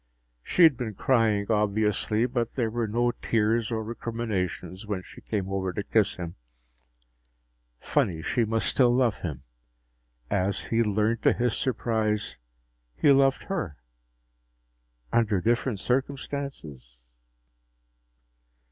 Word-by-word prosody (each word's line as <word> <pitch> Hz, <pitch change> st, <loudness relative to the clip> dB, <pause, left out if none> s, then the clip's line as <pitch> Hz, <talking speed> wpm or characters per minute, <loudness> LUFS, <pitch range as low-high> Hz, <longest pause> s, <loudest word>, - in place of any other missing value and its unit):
She 175 Hz, -, +2 dB
had 155 Hz, -7 st, +7 dB
been 110 Hz, -4 st, -4 dB
crying, 110 Hz, -5 st, +2 dB
obviously, 105 Hz, +1 st, +1 dB
but 120 Hz, -2 st, -2 dB
there 115 Hz, -4 st, 0 dB
were 120 Hz, -1 st, -1 dB
no 120 Hz, +3 st, +1 dB
tears 110 Hz, -1 st, 0 dB
or 110 Hz, -1 st, -1 dB
recriminations 105 Hz, -5 st, -4 dB
when 100 Hz, -3 st, -3 dB
she -, -, -14 dB
came 100 Hz, -4 st, -3 dB
over 95 Hz, -1 st, -1 dB
to 105 Hz, -, -3 dB
kiss 105 Hz, 0 st, +2 dB
him. 85 Hz, -4 st, -7 dB, 1.4 s
Funny, 80 Hz, -4 st, 0 dB
she 120 Hz, -, +1 dB
must 115 Hz, 0 st, 0 dB
still 125 Hz, -3 st, +3 dB
love 120 Hz, -4 st, +2 dB
him 70 Hz, -7 st, -5 dB, 0.9 s
as 95 Hz, 0 st, 0 dB
he'd 115 Hz, -1 st, +2 dB
learned 110 Hz, +3 st, +1 dB
to -, -, +4 dB
his 120 Hz, -1 st, 0 dB
surprise 110 Hz, -, -1 dB, 0.6 s
he 145 Hz, -, +4 dB
loved 135 Hz, 0 st, +4 dB
her. 155 Hz, -, -3 dB, 1.4 s
Under 110 Hz, -4 st, +3 dB
different 120 Hz, +1 st, 0 dB
circumstances 125 Hz, -, -4 dB
110 Hz, 120 wpm, -27 LUFS, 100-120 Hz, 1.4 s, had